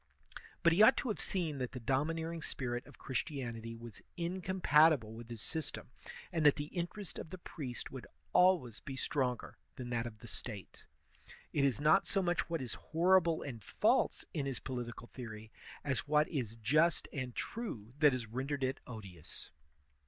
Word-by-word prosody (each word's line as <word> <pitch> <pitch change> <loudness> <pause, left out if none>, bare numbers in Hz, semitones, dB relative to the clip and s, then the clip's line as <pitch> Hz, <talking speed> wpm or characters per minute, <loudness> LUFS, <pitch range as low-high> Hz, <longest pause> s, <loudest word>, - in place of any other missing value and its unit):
But 170 -1 +6
he 185 - +5
ought 220 +5 +8
to 255 - -1
have 215 - -1
seen 165 -7 -1
that 125 -1 -3
the 130 - -4
domi 135 +7 +1
neering 165 0 -3
spirit 120 -2 -3
of 145 - -14
Christianity 120 -4 -3
was 115 -1 -9 0.2
incompatible 165 - +4
with 115 +1 -9
his 115 -3 -6
system, 160 -5 -3 0.4
and 165 -3 0
that 145 -2 +7
the 145 0 -5
interest 180 +3 -3
of - - -7
the 185 - -6
priest 140 -8 -6
would 130 -2 -7 0.3
always 175 - +4
be 135 - -6
stronger 130 -3 -1 0.2
than 125 -1 -6
that 120 0 0
of 110 -2 -9
the 115 - -11
State. 105 -5 -8 0.7
It 145 - +3
is 140 -1 +3
not 155 +6 +5
so 195 - +1
much 175 -1 +1
what 165 -5 -1
is 120 - -3
horrible 170 0 +3
and 120 -7 -6
false - - +2
in 140 -3 -1
his 135 -3 -2
political 120 -2 -5
theory 110 -3 -7 0.3
as 135 -2 -1
what 150 +1 +4
is 120 -8 -2
just 150 +10 +3
and 130 -4 -3
true 125 - -4
that 150 -2 +7
has 125 -2 -2
rendered 135 +5 -2
it 130 +1 0
odious. 100 - -7
135 Hz, 175 wpm, -35 LUFS, 120-165 Hz, 0.7 s, ought